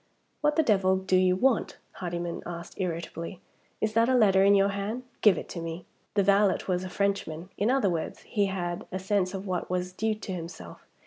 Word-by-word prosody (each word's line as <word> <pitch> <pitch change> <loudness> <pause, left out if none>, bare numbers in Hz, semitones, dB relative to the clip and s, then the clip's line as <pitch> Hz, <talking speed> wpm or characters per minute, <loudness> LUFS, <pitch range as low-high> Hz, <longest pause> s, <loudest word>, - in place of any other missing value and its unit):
"What 295 0 +2
the 320 - +4
devil 190 -6 +3
do 190 0 0
you 185 0 +4
want?" 245 +4 +1 0.2
Hardyman 175 -1 -4
asked 170 +2 -8
irritably. 170 0 -4 0.4
"Is 215 0 0
that 230 +2 +4
a 260 - +4
letter 195 -5 +5
in 200 +1 +6
your 195 0 +4
hand? 200 +5 -3 0.2
Give 210 -3 +6
it - - -5
to 170 - -5
me." 165 +1 -6 0.3
The 200 - +4
valet 200 0 +4
was 180 -1 0
a 185 - -5
Frenchman. 185 -3 -2
In 210 - +1
other 260 -5 +3
words, 165 -2 -3
he 205 -3 0
had 175 -2 -3
a 185 - -2
sense 190 0 0
of 195 +1 -5
what 185 -2 -2
was 180 0 -2
due 220 +3 0
to 210 -2 -7
himself. 170 0 -8
190 Hz, 205 wpm, -28 LUFS, 180-205 Hz, 0.4 s, in